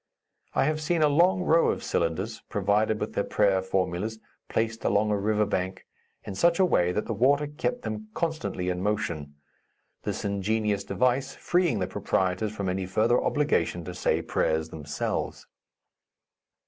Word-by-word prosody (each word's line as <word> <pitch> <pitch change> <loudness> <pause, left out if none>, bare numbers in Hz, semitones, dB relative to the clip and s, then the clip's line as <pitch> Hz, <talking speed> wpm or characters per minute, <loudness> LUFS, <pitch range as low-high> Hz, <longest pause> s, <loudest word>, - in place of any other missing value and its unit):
I - - +4
have 155 +2 0
seen 160 +1 +1
a - - +6
long 175 +5 +3
row 165 -1 +4
of - - -2
cylinders, 95 +7 -1
provided 105 +1 +1
with 105 - -3
their 100 - 0
prayer 100 -3 +2
formulas, 95 +3 -1 0.3
placed 115 0 -1
along 105 +1 +2
a - - +3
river 105 +1 +1
bank, 95 -2 -3 0.4
in 100 - -6
such 170 - +3
a 190 - +6
way 90 - +2
that 105 - -1
the - - -2
water 140 +6 +3
kept 145 -4 -3
them 110 -1 -4
constantly 160 - -2
in 90 0 -2
motion, 85 -8 -2 0.7
this - - -4
ingenious 100 +1 0
device 130 +5 0
freeing 175 -9 +1
the 95 - 0
proprietors 95 +4 -1
from 100 -3 -4
any 95 0 -1
further 110 +6 +2
obligation 145 - +1
to 90 - -6
say - - 0
prayers 80 0 0
themselves. 75 -2 -3
105 Hz, 160 wpm, -27 LUFS, 95-130 Hz, 0.7 s, a